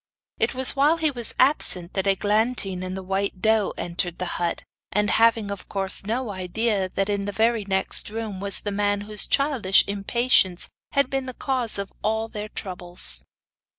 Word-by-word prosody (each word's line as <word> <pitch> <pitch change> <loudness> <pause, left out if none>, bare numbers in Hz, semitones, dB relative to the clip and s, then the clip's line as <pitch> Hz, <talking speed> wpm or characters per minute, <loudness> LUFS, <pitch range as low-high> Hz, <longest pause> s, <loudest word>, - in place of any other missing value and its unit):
It - - 0
was 260 0 +4
while 290 +4 +3
he 315 -2 +1
was 240 -4 -5
absent 195 - +4
that 190 0 -1
Eglantine 205 -1 0
and 185 +1 -5
the 190 - -7
white 195 0 -2
doe 220 +1 +2
entered 175 0 -3
the 180 - -3 0.2
hut, 170 - -2 0.3
and 210 0 +1
having, 225 -2 +3
of 200 - -8
course, 195 -1 -1
no 235 0 -2
idea 195 +1 -1
that 195 +1 -2
in 200 -1 -2
the 205 - -3
very 225 0 +1
next 190 +1 0
room 215 -3 -5
was 200 0 +1
the 205 - -4
man 205 0 0
whose 210 0 0
childish 270 -10 +3
impatience 200 -2 +1 0.2
had 280 -2 +1
been 270 -1 -2
the 255 - -7
cause 255 -6 -1
of 200 0 -5
all 220 +1 -1
their 210 -1 -7
troubles. 175 - +1
205 Hz, 180 wpm, -23 LUFS, 190-230 Hz, 0.3 s, was